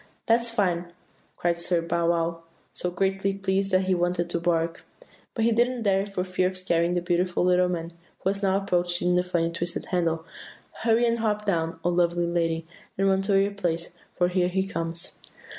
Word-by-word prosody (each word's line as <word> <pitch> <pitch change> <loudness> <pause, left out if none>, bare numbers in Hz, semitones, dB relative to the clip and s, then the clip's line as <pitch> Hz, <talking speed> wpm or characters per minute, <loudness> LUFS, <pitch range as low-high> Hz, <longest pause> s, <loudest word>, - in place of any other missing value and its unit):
"'That's 235 +1 +3
fine!' 180 -6 0 0.5
cried 170 -1 0
Sir 170 0 +1
Bow 170 0 0
wow, 165 0 0 0.3
so 180 - -1
greatly 195 +2 0
pleased 195 0 0
that 185 -1 +3
he 190 - +2
wanted 175 -1 0
to 170 - 0
bark; 165 -1 0 0.5
but 225 - +1
he 235 - +4
didn't 240 +1 +1
dare 195 -1 +2
for 195 -2 -2
fear 185 0 0
of 185 0 -5
scaring 175 -1 +1
the 175 - +1
beautiful 175 0 +1
little 180 0 +4
man 170 -1 -3
who 170 +2 -6
was 200 0 -5
now 195 -1 +2
approaching 175 -2 0
the 180 - +4
funny 170 -2 0
twisted 170 +1 -3
handle. 165 -2 0 0.6
'Hurry 230 +1 +3
and 235 0 +1
hop 210 -1 0
down, 165 -4 -1
O 175 - +2
lovely 175 0 +2
lady, 165 -1 0 0.3
and 195 +1 +2
run 190 0 +3
to 195 0 +3
your 200 +1 +2
place, 175 -3 -2 0.2
for 175 - +3
here 180 -1 +2
he 190 +1 0
comes! 165 -3 -4
180 Hz, 190 wpm, -26 LUFS, 170-195 Hz, 0.6 s, he